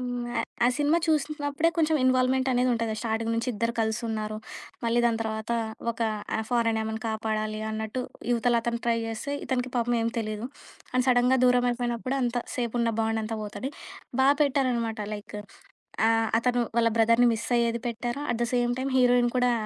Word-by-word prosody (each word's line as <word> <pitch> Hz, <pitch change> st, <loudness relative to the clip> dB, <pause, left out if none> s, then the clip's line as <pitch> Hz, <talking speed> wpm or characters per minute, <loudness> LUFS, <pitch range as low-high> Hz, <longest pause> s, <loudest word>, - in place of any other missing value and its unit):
హ్మ్ 245 Hz, -1 st, -3 dB
ఆహ్, -, -, -1 dB, 0.2 s
ఆ -, -, +6 dB
సినిమా 295 Hz, +3 st, +3 dB
చూసినప్పుడే 300 Hz, 0 st, +1 dB
కొంచెం 315 Hz, -1 st, +3 dB
ఇన్వాల్వ్‌మెంటనేదుంటది. 255 Hz, -3 st, +2 dB
స్టార్టింగ్ 225 Hz, 0 st, -1 dB
నుంచి 230 Hz, +2 st, -1 dB
ఇద్దరు 230 Hz, +2 st, -1 dB
కలిసున్నారు. 220 Hz, -1 st, -2 dB, 0.5 s
మళ్ళీ 235 Hz, +1 st, +2 dB
దాని 230 Hz, -1 st, +2 dB
తర్వాత 220 Hz, +1 st, -3 dB, 0.4 s
ఒక 230 Hz, -, -9 dB, 0.5 s
ఫారెన్ 230 Hz, -2 st, +1 dB
ఆమెను 220 Hz, 0 st, -4 dB
కాపాడాలి 215 Hz, -1 st, -2 dB
అన్నట్టు 220 Hz, +3 st, -3 dB, 0.3 s
ఇవతల 240 Hz, 0 st, +2 dB
అతను 235 Hz, 0 st, -1 dB
ట్రై 230 Hz, -1 st, +3 dB
జేస్తే, 225 Hz, +5 st, -4 dB
ఇతనికి 255 Hz, -1 st, -1 dB
పాపం 240 Hz, 0 st, +1 dB
ఏం 230 Hz, -, +1 dB
తెలీదు, 215 Hz, +1 st, -3 dB, 0.5 s
అండ్ 255 Hz, 0 st, +2 dB
సడన్‌గా 250 Hz, +1 st, +4 dB
దూరం 250 Hz, 0 st, +4 dB
అయిపోయినప్పుడు 240 Hz, +2 st, -2 dB
అంత 245 Hz, 0 st, -1 dB, 0.2 s
సేపు 240 Hz, -3 st, -2 dB
ఉన్న 230 Hz, -1 st, +1 dB
బాండంతా 225 Hz, 0 st, -1 dB
పోతది. 210 Hz, +6 st, -5 dB, 0.5 s
బా 265 Hz, -, +5 dB, 0.2 s
పెట్టారనమాట 250 Hz, -6 st, 0 dB
లైక్ 210 Hz, 0 st, -7 dB, 0.7 s
ఆహ్, 225 Hz, 0 st, +2 dB
అతను 245 Hz, 0 st, +1 dB, 0.2 s
వాళ్ళ 230 Hz, 0 st, +4 dB
బ్రదర్‌ని 230 Hz, +2 st, +5 dB
మిస్ 230 Hz, -, -5 dB
అయ్యేది 235 Hz, 0 st, 0 dB
పెట్టారు, 240 Hz, +4 st, -3 dB
at 235 Hz, -, -4 dB
the 235 Hz, -, 0 dB
same 245 Hz, 0 st, +2 dB
time 265 Hz, +1 st, -2 dB
heroine 245 Hz, -1 st, +4 dB
కూడా 250 Hz, 0 st, +3 dB
235 Hz, 160 wpm, -27 LUFS, 225-250 Hz, 0.7 s, ఆ